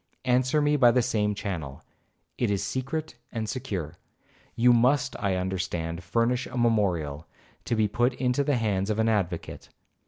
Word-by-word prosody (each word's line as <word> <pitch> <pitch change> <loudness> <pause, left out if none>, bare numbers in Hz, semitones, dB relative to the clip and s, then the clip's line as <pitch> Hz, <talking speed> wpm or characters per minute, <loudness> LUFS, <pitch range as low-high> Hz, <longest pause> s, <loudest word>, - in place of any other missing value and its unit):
Answer 130 +4 +2
me 145 0 +3
by 125 -4 +6
the 120 +1 +3
same 105 -4 0
channel, 85 -10 -5 0.5
it 120 +1 0
is 100 -1 0
secret 135 +4 -3
and 110 -1 -3
secure. 90 - -4 0.6
You 120 +1 +5
must, 125 +3 +2
I 100 -3 0
understand, 90 -2 -3
furnish 115 +6 0
a - - -7
memorial, 90 -10 0 0.4
to 120 - 0
be 110 -1 +2
put 120 +4 +1
into 125 +2 +1
the 140 -2 +1
hands 100 -3 0
of 105 - 0
an 110 0 +2
advocate. 90 -6 -2
110 Hz, 160 wpm, -27 LUFS, 95-125 Hz, 0.6 s, by